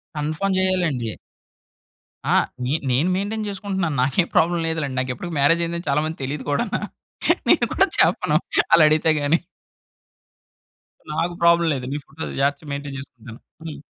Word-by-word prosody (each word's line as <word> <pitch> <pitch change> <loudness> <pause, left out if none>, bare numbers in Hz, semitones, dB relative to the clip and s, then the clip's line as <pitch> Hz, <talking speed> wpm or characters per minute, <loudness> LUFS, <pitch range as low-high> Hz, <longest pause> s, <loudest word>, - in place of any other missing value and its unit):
Confirm 155 +6 -1
జేయాలండి. 170 - 0 1.1
అహా! - - +3 0.3
నే 130 - 0 0.2
నేను 145 +9 +2
మెయింటైన్ 210 +3 -2
చేసుకుంటున్నాను 190 -6 -2
నాకేం 155 +7 +1
ప్రాబ్లమ్ 170 0 +3
లేదులెండి. 145 -5 -2
నాకిప్పటికి 130 +7 -4
మ్యారేజయిందని 170 +3 +1
చాలా 140 +2 +2
మందికి 160 -3 -5
తెలియదు 135 0 -4
కూడాన. 145 - -1 0.8
నేను - - +5
కూడా - - +4
చెప్పను. - - +3 0.3
ఆళ్ళడిగితే 155 -1 +5
గాని. 145 +4 +2 1.7
నాకు 170 +3 -1
ప్రాబ్లం 170 0 +5
లేదు. 130 -2 -4
నీ - - -1
ఫోటో 160 +2 -9 0.2
జాగ్రతగా 140 +1 -1
మెయింటేన్ 140 -1 -5
చేసుకుంటేను. 120 -4 -11 0.2
హ్మ్. 160 -3 -7
155 Hz, 130 wpm, -22 LUFS, 140-170 Hz, 1.7 s, నేను